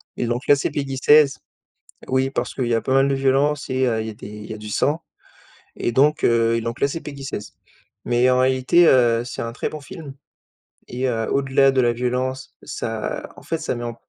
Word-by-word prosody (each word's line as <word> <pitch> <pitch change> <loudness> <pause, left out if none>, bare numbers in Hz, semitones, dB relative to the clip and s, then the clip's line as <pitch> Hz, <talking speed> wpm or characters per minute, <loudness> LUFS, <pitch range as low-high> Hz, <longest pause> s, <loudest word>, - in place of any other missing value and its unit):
et - - -2
donc 120 +2 -3
là 145 - +7
c'est 140 - -2
PEGI 135 -2 -3
16 145 +1 +5 0.7
oui 130 +1 +1
parce - - -3
qu'il 130 - -2
y 120 - +1
a 115 - +2
pas 130 - -1
mal 135 0 +4
de 140 - +1
violence 135 +2 +1
et 130 0 +1
heu, 115 -2 0
il 110 - -4
y - - -3
a - - -10
des - - -11
il 105 0 -10
y - - -4
a - - -7
du 105 0 -9
sang 150 +9 0 0.8
et 120 - -2
donc 150 +5 +3
heu, 115 -1 +3
ils 115 - -3
l'ont 115 - -2
classé 140 +6 -1
PEGI 140 -3 -9
16. 105 -6 -6 0.5
Mais 120 +1 +3
en 125 0 +3
réalité, 130 +6 +4
heu, 120 -2 +4
c'est 130 - -6
un 115 0 -4
très - - -3
bon 155 - -7
film 140 -1 -10 0.7
et 125 +2 -2
heu, 115 -3 -1
au-delà 135 0 +3
de 135 - 0
la 120 -2 +3
violence 125 +2 -3
ça 110 -1 -5
en - - -12
fait, 165 - -2
ça - - -3
met 120 0 -5
en 120 -1 -5
130 Hz, 235 wpm, -22 LUFS, 120-140 Hz, 0.8 s, là